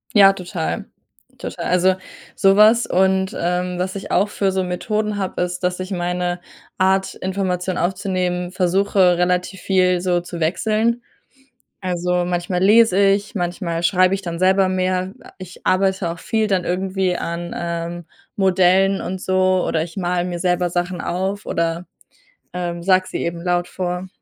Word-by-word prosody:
Ja, 195 Hz, -1 st, +8 dB
total, 175 Hz, -, -4 dB, 0.5 s
total. -, -, -6 dB
Also, 185 Hz, +1 st, +3 dB, 0.4 s
sowas 210 Hz, +4 st, +5 dB
und, 190 Hz, 0 st, +1 dB
ähm, 180 Hz, +1 st, -1 dB
was 185 Hz, +2 st, -2 dB
ich 195 Hz, -, -6 dB
auch 200 Hz, +3 st, +3 dB
für 195 Hz, -2 st, 0 dB
so 190 Hz, -, 0 dB
Methoden 210 Hz, +3 st, -2 dB
habe, 190 Hz, -2 st, -3 dB
ist, 180 Hz, 0 st, -2 dB
dass 180 Hz, 0 st, 0 dB
ich 185 Hz, +2 st, -5 dB
meine 180 Hz, 0 st, -2 dB, 0.4 s
Art 190 Hz, +1 st, +1 dB
Information 185 Hz, -1 st, -2 dB
aufzunehmen, 180 Hz, -1 st, -1 dB
versuche, 185 Hz, -1 st, +2 dB
relativ 180 Hz, +1 st, 0 dB
viel 180 Hz, -2 st, +2 dB
so 180 Hz, -1 st, +1 dB
zu 170 Hz, -1 st, -8 dB
wechseln. 220 Hz, +8 st, +1 dB, 0.8 s
Also, 180 Hz, -1 st, -1 dB
manchmal 180 Hz, 0 st, -2 dB
lese 210 Hz, 0 st, +5 dB
ich, 200 Hz, +1 st, +2 dB
manchmal 175 Hz, -2 st, -2 dB
schreibe 185 Hz, +1 st, +3 dB
ich 195 Hz, -, -2 dB
dann 170 Hz, -2 st, -5 dB
selber 190 Hz, +1 st, +4 dB
mehr. 185 Hz, 0 st, -1 dB, 0.2 s
Ich 185 Hz, -1 st, -11 dB
arbeite 190 Hz, -1 st, +1 dB
auch 170 Hz, -, -8 dB
viel 220 Hz, +4 st, 0 dB
dann 190 Hz, -4 st, 0 dB
irgendwie 185 Hz, 0 st, -1 dB
an, 170 Hz, +1 st, -4 dB
ähm, 170 Hz, 0 st, -4 dB, 0.3 s
Modellen 190 Hz, 0 st, +3 dB
und 185 Hz, 0 st, -5 dB
so, 185 Hz, -1 st, +2 dB
oder 160 Hz, -1 st, 0 dB
ich 165 Hz, -1 st, -10 dB
male 180 Hz, -1 st, -1 dB
mir 175 Hz, -1 st, -4 dB
selber 180 Hz, 0 st, +1 dB
Sachen 175 Hz, 0 st, -2 dB
auf 190 Hz, +5 st, -3 dB
oder, 165 Hz, +1 st, -1 dB, 0.7 s
ähm, 175 Hz, -1 st, -4 dB
sage 185 Hz, -1 st, +3 dB
sie -, -, -4 dB
eben 170 Hz, 0 st, -4 dB
laut 175 Hz, -1 st, 0 dB
vor. 180 Hz, 0 st, -4 dB
185 Hz, 155 wpm, -20 LUFS, 175-190 Hz, 0.8 s, Ja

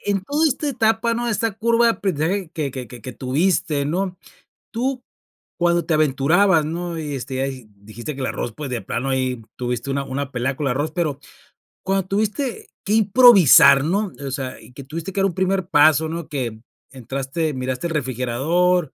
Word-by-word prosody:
en 200 Hz, -1 st, -1 dB
toda 295 Hz, +9 st, +1 dB
esta 295 Hz, +1 st, -1 dB
etapa, 230 Hz, -2 st, +1 dB
¿no? 240 Hz, +1 st, -2 dB
Esta 230 Hz, -1 st, 0 dB
curva 230 Hz, +2 st, +2 dB
de 230 Hz, -, +4 dB
aprendizaje 185 Hz, -1 st, -2 dB
que 150 Hz, -4 st, -3 dB
que 130 Hz, -2 st, -7 dB
que 125 Hz, +1 st, -9 dB
tuviste 145 Hz, +1 st, 0 dB
¿no? 180 Hz, +3 st, -2 dB, 0.5 s
Tú 250 Hz, +2 st, -2 dB, 0.6 s
cuando 175 Hz, 0 st, +2 dB
te 165 Hz, -, 0 dB
aventurabas, 155 Hz, +4 st, +3 dB
¿no? 170 Hz, +1 st, -4 dB
Y, 150 Hz, -2 st, -4 dB
este, 130 Hz, +1 st, -6 dB
ya 135 Hz, -3 st, -3 dB
dijiste 110 Hz, +8 st, -8 dB
que 135 Hz, -, -7 dB
el -, -, -1 dB
arroz, 120 Hz, -, -3 dB
pues, 150 Hz, -3 st, -6 dB
de 120 Hz, -, -2 dB
plano 120 Hz, +7 st, -3 dB
ahí 130 Hz, -3 st, -1 dB
tuviste 125 Hz, +2 st, -3 dB
una 140 Hz, 0 st, -1 dB
una 140 Hz, +1 st, -4 dB
pelea 130 Hz, +1 st, -2 dB
con 145 Hz, -, -3 dB
el -, -, +1 dB
arroz, 145 Hz, +4 st, -2 dB
pero 155 Hz, -4 st, -2 dB, 0.6 s
cuando 195 Hz, -1 st, 0 dB
tuviste 240 Hz, -, -2 dB, 0.2 s
que 205 Hz, -, 0 dB
improvisar, 200 Hz, -, +7 dB
¿no? 195 Hz, +4 st, -1 dB
O -, -, -4 dB
sea, 130 Hz, -1 st, -4 dB
y -, -, -15 dB
que 140 Hz, -, -9 dB
tuviste 165 Hz, +6 st, -6 dB
que -, -, -2 dB
dar -, -, +3 dB
un 180 Hz, -, -5 dB
primer 190 Hz, -1 st, 0 dB
paso, 155 Hz, -1 st, +4 dB
¿no? 165 Hz, -1 st, -5 dB
Que 125 Hz, -7 st, -3 dB, 0.4 s
entraste, 135 Hz, +5 st, -3 dB
miraste 130 Hz, +4 st, -3 dB
el 165 Hz, -, -5 dB
refrigerador 145 Hz, +6 st, 0 dB
155 Hz, 185 wpm, -21 LUFS, 135-195 Hz, 0.6 s, improvisar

